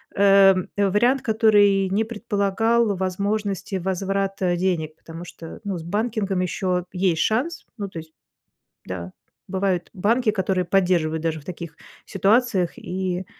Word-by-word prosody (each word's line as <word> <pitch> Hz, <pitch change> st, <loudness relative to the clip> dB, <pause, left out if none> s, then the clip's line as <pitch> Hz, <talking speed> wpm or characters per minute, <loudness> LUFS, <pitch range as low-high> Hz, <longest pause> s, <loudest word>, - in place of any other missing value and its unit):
эм, 195 Hz, -2 st, +5 dB
вариант 210 Hz, +7 st, +2 dB
который 205 Hz, -3 st, +4 dB
не 205 Hz, +4 st, +1 dB
предполагал 225 Hz, 0 st, 0 dB
возможности 200 Hz, +1 st, -2 dB
возврата 190 Hz, 0 st, -1 dB
денег, 170 Hz, -4 st, -1 dB
потому 165 Hz, +1 st, -10 dB
что, 165 Hz, -1 st, -10 dB
ну, 200 Hz, -3 st, -3 dB
с -, -, -8 dB
банкингом 205 Hz, +1 st, -1 dB
еще 180 Hz, 0 st, -1 dB
есть 180 Hz, -3 st, +1 dB
шанс, 265 Hz, +11 st, -1 dB
ну, 200 Hz, -2 st, -4 dB
то 180 Hz, -, -10 dB
есть, 160 Hz, 0 st, -12 dB, 0.7 s
да, 90 Hz, -1 st, -6 dB, 0.4 s
бывают 190 Hz, -2 st, -1 dB
банки, 220 Hz, +4 st, +2 dB
которые 190 Hz, -2 st, 0 dB
поддерживают 175 Hz, -4 st, +1 dB
даже 160 Hz, -1 st, -2 dB
в -, -, -21 dB
таких 170 Hz, -3 st, -7 dB, 0.3 s
ситуациях 195 Hz, -2 st, +1 dB
и 185 Hz, 0 st, -3 dB
195 Hz, 130 wpm, -23 LUFS, 180-205 Hz, 0.7 s, эм